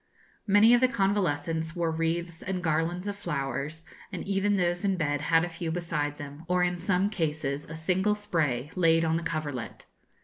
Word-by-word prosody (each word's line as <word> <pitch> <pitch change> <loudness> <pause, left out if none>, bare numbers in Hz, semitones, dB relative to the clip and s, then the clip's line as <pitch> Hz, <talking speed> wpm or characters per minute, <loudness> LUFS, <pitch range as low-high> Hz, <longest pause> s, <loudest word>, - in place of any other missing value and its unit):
Many 205 +4 +6
of 245 - +5
the 255 - +6
convalescents 165 - 0
wore 170 -2 0
wreaths 165 +1 -2
and 185 -1 -3
garlands 165 +4 0
of 205 - -2
flowers, 150 -3 -3 0.3
and - - -5
even 200 +1 +1
those 175 0 0
in 195 -2 +1
bed 145 -3 0
had 165 +2 +3
a - - -4
few 170 -1 -5
beside 160 -4 -2
them, 145 +1 -9
or 180 0 +2
in 175 0 0
some 190 +2 +1
cases 150 -6 -2
a 160 - -8
single 190 +6 +1
spray 155 -9 -1
laid 165 -2 +4
on 160 0 +1
the - - -3
coverlet. 145 -8 -4
165 Hz, 180 wpm, -28 LUFS, 155-185 Hz, 0.3 s, Many